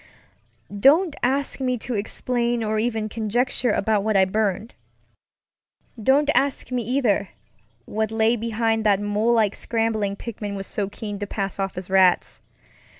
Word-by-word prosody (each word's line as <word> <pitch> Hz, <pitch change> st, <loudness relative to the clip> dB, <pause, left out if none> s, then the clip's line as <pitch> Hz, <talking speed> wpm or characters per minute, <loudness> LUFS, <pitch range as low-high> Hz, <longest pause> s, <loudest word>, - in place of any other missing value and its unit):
Don't 305 Hz, -, +4 dB
ask 270 Hz, +3 st, 0 dB
me 255 Hz, -1 st, 0 dB
to 240 Hz, +2 st, -5 dB
explain 235 Hz, +2 st, -1 dB
or 215 Hz, 0 st, 0 dB
even 220 Hz, -1 st, -1 dB
conjecture 235 Hz, +3 st, -1 dB
about 210 Hz, -1 st, +1 dB
what 215 Hz, -1 st, +1 dB
I 190 Hz, -, +5 dB
burned. 210 Hz, +2 st, -1 dB, 1.3 s
Don't 285 Hz, +6 st, +3 dB
ask 275 Hz, -1 st, 0 dB
me, 250 Hz, -1 st, 0 dB
either, 225 Hz, -5 st, 0 dB, 0.6 s
what 220 Hz, 0 st, -2 dB
lay 225 Hz, +1 st, +2 dB
behind 225 Hz, 0 st, -1 dB
that 205 Hz, -2 st, +3 dB
mole 205 Hz, +3 st, +1 dB
like 215 Hz, -3 st, +2 dB
scrambling 220 Hz, -3 st, -1 dB
Pickman 210 Hz, -2 st, -6 dB
was 195 Hz, 0 st, -5 dB
so 200 Hz, 0 st, -2 dB
keen 205 Hz, 0 st, -6 dB
to 205 Hz, -, -4 dB
pass 195 Hz, -2 st, -4 dB
off 195 Hz, -2 st, -3 dB
as 180 Hz, 0 st, -6 dB
rats. 190 Hz, -2 st, +3 dB
220 Hz, 150 wpm, -23 LUFS, 205-240 Hz, 1.3 s, I